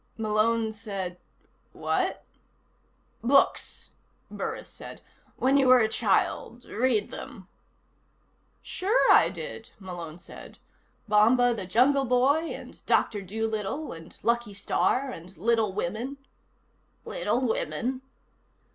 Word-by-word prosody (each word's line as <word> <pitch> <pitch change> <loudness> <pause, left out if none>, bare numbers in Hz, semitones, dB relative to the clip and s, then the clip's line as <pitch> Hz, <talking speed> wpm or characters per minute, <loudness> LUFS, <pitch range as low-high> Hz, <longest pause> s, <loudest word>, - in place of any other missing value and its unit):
Malone 220 +1 +1
said: 195 -5 -5 0.5
"What?" - - -1 1.0
"Books," 275 +4 +2 0.4
Burris - - -4
said. - - -10 0.4
"When 270 +2 +3
you 270 -2 +4
were 255 0 +8
a 220 - +3
child. 225 +3 0
Read 230 -2 0
them." 230 -10 -9 1.2
"Sure 410 +6 +2
I - - +7
did," - - -7
Malone 175 -4 -7
said. 175 - -12 0.5
"Bomba 235 +4 +5
the 195 -5 -5
Jungle 270 +8 +4
Boy, 265 +6 +3
and - - -10
Doctor 205 -2 +2
Doolittle, 220 - -3
and 165 0 -12
Lucky 235 -3 0
Starr, 260 +6 0
and 175 -2 -11
Little 220 +2 +2
Women 215 +8 -3 0.4
" - - -41
_"Little 260 - 0
Women?" 255 +3 -2
225 Hz, 110 wpm, -27 LUFS, 200-255 Hz, 1.2 s, were